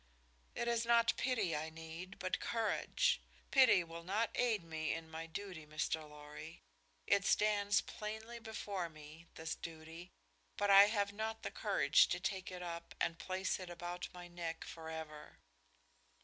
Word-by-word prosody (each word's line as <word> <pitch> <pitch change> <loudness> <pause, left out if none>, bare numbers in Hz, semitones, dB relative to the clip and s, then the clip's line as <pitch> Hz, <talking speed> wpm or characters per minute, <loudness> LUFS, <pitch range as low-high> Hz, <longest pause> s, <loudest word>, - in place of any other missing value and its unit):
"It 235 - -1
is 235 -1 +2
not 235 0 +5
pity 220 -11 +1
I 155 +2 -2
need, 165 +3 -8
but 185 -1 -1
courage. 230 -1 +1 0.3
Pity 260 -9 +7
will 165 0 -8
not 205 +6 0
aid 230 -6 +2
me 160 -1 -2
in 160 0 -6
my 165 +1 -5
duty, 175 -1 -6
Mr. 155 0 -2
Lorry. 150 +2 -10 0.4
It 200 - +4
stands 205 -1 +3
plainly 220 +2 -6
before 205 -5 -4
me, 155 +2 -12
this 160 0 -3
duty, 165 +2 -8 0.5
but 205 0 +3
I 195 +1 +11
have 205 -1 0
not 220 +1 -3
the - - -3
courage - - +4
to - - -1
take 190 -2 -2
it 180 -1 -6
up 170 -1 -6
and 165 - 0
place 185 0 -1
it 185 -1 -7
about 175 +1 -5
my 180 0 -9
neck 170 -2 -4
forever." 160 -2 -7
175 Hz, 155 wpm, -37 LUFS, 160-205 Hz, 0.5 s, I